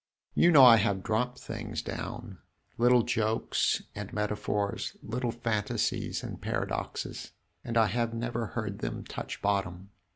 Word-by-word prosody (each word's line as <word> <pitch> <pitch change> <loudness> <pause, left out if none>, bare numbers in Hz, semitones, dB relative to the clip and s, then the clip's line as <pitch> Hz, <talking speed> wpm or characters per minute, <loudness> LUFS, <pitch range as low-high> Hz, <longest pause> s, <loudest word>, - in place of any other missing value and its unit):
You 170 - +5
know 140 -5 +9
I 115 -2 +9
have 100 -3 +1
dropped 125 +2 0
things - - -5
down 115 -5 -6 0.4
little 120 0 +5
jokes 110 0 +1
and 105 -1 -6
metaphors, 105 -1 -2
little 120 +2 -2
fantasies 115 -3 -1
and - - -7
paradoxes - - -3 0.3
and 115 -1 -2
I 110 - +6
have 115 +1 0
never 115 0 -2
heard 105 -4 -4
them - - -4
touch - - -7
bottom!" 100 -1 -1
115 Hz, 135 wpm, -29 LUFS, 105-120 Hz, 0.4 s, know